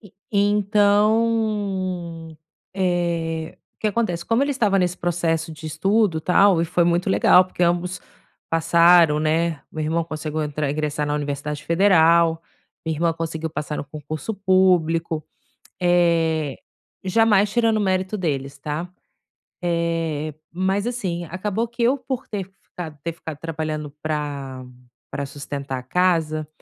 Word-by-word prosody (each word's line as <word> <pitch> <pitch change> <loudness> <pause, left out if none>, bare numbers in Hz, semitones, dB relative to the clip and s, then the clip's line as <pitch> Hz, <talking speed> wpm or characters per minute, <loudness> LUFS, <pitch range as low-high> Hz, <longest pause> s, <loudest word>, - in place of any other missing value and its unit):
E 205 -5 -16 0.2
então, 205 -4 +1 0.4
eh, 170 -3 -1 0.2
o - - -57
que - - 0
acontece, 190 -6 -1
como 230 +3 +2
ele 285 - -1
estava 210 -7 +2
nesse 180 -1 0
processo 165 -2 -1
de 155 +1 -9
estudo 195 +1 +1
tal 180 +1 +4
e - - +1
foi 170 +1 +1
muito 175 +3 +1
legal 185 -1 +6
porque 185 - -12
ambos 175 +1 0 0.5
passaram, 170 -1 +5
né, 160 0 0
meu 155 - -3
irmão 165 +2 0
conseguiu 155 -1 -4
entrar, 150 -1 -2
ingressar 150 0 -2
na 145 - -1
Universidade 145 0 -4
Federal, 170 -1 +4 0.5
minha 160 -1 -1
irmã 165 +2 +1
conseguiu 160 -1 -4
passar 150 0 -4
no - - -4
concurso 155 +6 -6
público, 180 -5 +2 0.6
eh, 165 -4 +2 0.5
jamais 205 +1 +3
tirando 225 0 +2
o - - 0
mérito 190 0 0
deles 140 -7 -2
está, 150 +5 -4 0.7
eh, 165 -3 -1 0.2
mas 190 +4 0
assim, 185 -8 -3
acabou 205 +7 -2
que 235 +1 -4
eu 255 +4 +3
por 260 -1 -5
ter 205 -4 -3 0.2
ficado 160 -4 -8
ter 170 - -2
ficado 160 -2 -8
trabalhando 155 -2 -4
para 145 -4 -4 0.5
para 140 - -3
sustentar 140 -1 -5
a 125 - -7
casa, 160 0 +1
170 Hz, 140 wpm, -22 LUFS, 155-190 Hz, 0.7 s, legal